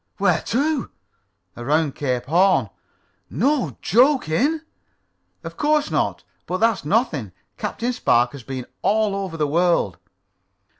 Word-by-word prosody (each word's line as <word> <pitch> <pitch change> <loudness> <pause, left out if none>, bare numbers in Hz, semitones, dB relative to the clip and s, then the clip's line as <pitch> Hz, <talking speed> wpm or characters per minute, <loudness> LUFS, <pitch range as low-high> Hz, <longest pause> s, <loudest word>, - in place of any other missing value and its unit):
"Where - - +2
to?" 285 +2 0 0.7
"Around 145 +4 0
Cape 125 -3 -2
Horn." 155 - +3 0.6
"No 215 - 0
jokin'?" 260 - +3 0.8
"Of - - -8
course 300 0 +1
not. - - -1 0.2
But 185 - -1
that's 225 0 +1
nothing. 150 - 0 0.2
Captain 245 +2 -3
Spark 120 - +2
has 140 - -9
been 130 0 -6 0.2
all 210 +1 +1
over 190 -4 -4
the 150 - +1
world." 160 - +1
180 Hz, 115 wpm, -22 LUFS, -, 0.8 s, Horn